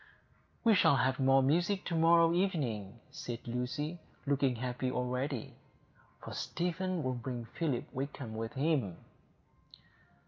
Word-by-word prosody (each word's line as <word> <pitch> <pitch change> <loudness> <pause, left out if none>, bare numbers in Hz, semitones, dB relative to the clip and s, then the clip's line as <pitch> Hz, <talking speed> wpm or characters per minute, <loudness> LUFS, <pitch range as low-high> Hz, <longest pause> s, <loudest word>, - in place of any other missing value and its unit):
"We 230 -2 +6
shall 185 -7 +5
have 130 0 +1
more 135 0 +5
music 175 +8 +2
to 170 - -1
morrow 165 0 +5
evening," 125 - -1
said 120 0 -6
Lucy, 145 +8 -2 0.3
looking 140 -2 +2
happy 125 +2 -2
already, 125 0 -2 0.7
"for - - -7
Stephen 180 0 -2
will 130 0 0
bring 120 -1 -4
Philip 130 0 -2
Wakem 130 -3 -4
with 115 +1 -4
him." 135 - +1
135 Hz, 125 wpm, -33 LUFS, 125-165 Hz, 0.7 s, We